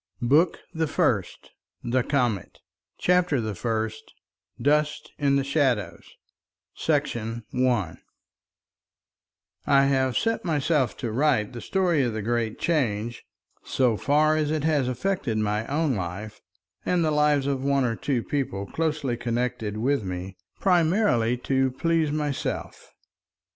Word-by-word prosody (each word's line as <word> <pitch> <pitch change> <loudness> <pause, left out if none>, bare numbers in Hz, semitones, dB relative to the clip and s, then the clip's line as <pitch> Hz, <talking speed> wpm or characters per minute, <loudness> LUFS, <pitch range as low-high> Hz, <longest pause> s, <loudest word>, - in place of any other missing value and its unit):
BOOK 150 +8 +4 0.2
THE 160 0 0
FIRST 145 - -1 0.3
THE 125 +2 +1
COMET 120 - -1 0.4
CHAPTER 180 -5 +2
THE 110 -2 -2
FIRST 110 +1 -3 0.4
DUST 150 +1 +1
IN 140 -1 +3
THE 140 - +2
SHADOWS 125 - 0 0.7
§ 115 0 -1
1 120 -10 0 1.7
I 140 0 +5
have 130 -2 +1
set 225 0 0
myself 150 -5 +1
to 115 - -3
write 130 -3 +1
the 120 - -7
story 180 -6 +1
of 120 -4 0
the 110 -1 -3
Great 115 -1 -1
Change, 120 -8 -1 0.4
so 125 -4 +1
far 150 +6 +3
as 155 -1 0
it 155 -1 -1
has 150 -5 +2
affected 130 - -1
my 105 +1 -1
own 150 0 +1
life 100 +2 -5 0.4
and 175 -2 +1
the 155 - +1
lives 150 -2 +3
of 135 -2 -1
one 140 -1 +2
or 115 -2 0
two 125 -3 -1
people 125 -9 -2
closely 150 -1 -1
connected 120 -2 -2
with 135 +2 +1
me, 95 +1 -5 0.2
primarily 165 - +2
to 130 +1 +1
please 160 +4 +1
myself. 150 -2 -3
130 Hz, 130 wpm, -25 LUFS, 115-150 Hz, 1.7 s, I